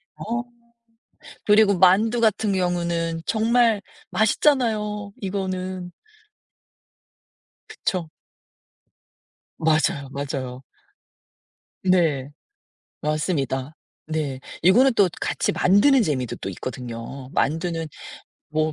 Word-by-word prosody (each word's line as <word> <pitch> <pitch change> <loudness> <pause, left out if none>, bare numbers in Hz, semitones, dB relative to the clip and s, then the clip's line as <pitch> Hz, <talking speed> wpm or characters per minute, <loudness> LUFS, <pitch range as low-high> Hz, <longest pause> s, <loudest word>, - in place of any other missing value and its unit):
어 230 +6 -5 1.0
그리고 210 -2 +5
만두 215 +6 +4
같은 215 -2 +2
경우는 170 -2 -1
정말 225 -1 +3 0.3
맛있잖아요, 215 -4 +1
이거는. 185 -2 -3 1.8
그쵸. 180 -5 -3 1.5
맞아요, 155 -2 +1
맞아요. 135 -2 -4 1.2
네 160 -7 +2 0.7
맞습니다. 150 -3 -1 0.3
네. 150 -4 -3 0.2
이거는 240 +9 +6
또 200 -4 +4
같이 - - 0
만드는 205 - +4
재미도 130 - -2
또 - - -6
있거든요. 125 +4 -7
만두는 165 +2 0 0.6
뭐 155 +1 0
180 Hz, 180 characters per minute, -23 LUFS, 150-210 Hz, 1.8 s, 이거는